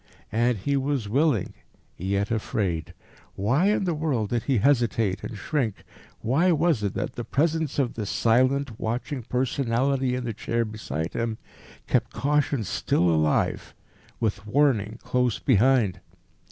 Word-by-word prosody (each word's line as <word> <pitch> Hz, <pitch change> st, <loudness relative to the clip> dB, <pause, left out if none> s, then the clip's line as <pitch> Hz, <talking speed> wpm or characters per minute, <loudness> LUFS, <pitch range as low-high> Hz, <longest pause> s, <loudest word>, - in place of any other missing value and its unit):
And 120 Hz, +1 st, +2 dB
he 140 Hz, +9 st, -1 dB
was 135 Hz, -4 st, -1 dB
willing, 135 Hz, -, +1 dB, 0.4 s
yet 100 Hz, +4 st, -1 dB
afraid. 90 Hz, -6 st, -2 dB, 0.4 s
Why 130 Hz, -, +2 dB
in 210 Hz, -1 st, +2 dB
the 175 Hz, -3 st, 0 dB
world 145 Hz, -9 st, -1 dB
did 120 Hz, -1 st, +1 dB
he 135 Hz, -3 st, +2 dB
hesitate 115 Hz, -6 st, +2 dB
and 110 Hz, -, -6 dB
shrink? 115 Hz, -2 st, -2 dB, 0.4 s
Why 160 Hz, +10 st, +3 dB
was 160 Hz, -6 st, +2 dB
it 100 Hz, -2 st, -2 dB
that -, -, -3 dB
the 120 Hz, -, -5 dB
presence 155 Hz, +4 st, 0 dB
of 135 Hz, -4 st, +1 dB
this 105 Hz, -3 st, -4 dB
silent, 130 Hz, +1 st, +2 dB
watching 125 Hz, +5 st, -3 dB
personality 130 Hz, +1 st, 0 dB
in 125 Hz, -, -3 dB
the 115 Hz, -2 st, -3 dB
chair 115 Hz, +2 st, -1 dB
beside 85 Hz, -8 st, -4 dB
him 115 Hz, -1 st, -2 dB, 0.5 s
kept -, -, 0 dB
caution 145 Hz, -3 st, +1 dB
still 90 Hz, -2 st, +1 dB
alive, 80 Hz, -1 st, 0 dB, 0.4 s
with 105 Hz, -2 st, -2 dB
warning 115 Hz, -4 st, +2 dB
close 125 Hz, -3 st, +1 dB
behind? 115 Hz, -5 st, +3 dB
120 Hz, 140 wpm, -25 LUFS, 105-140 Hz, 0.5 s, Why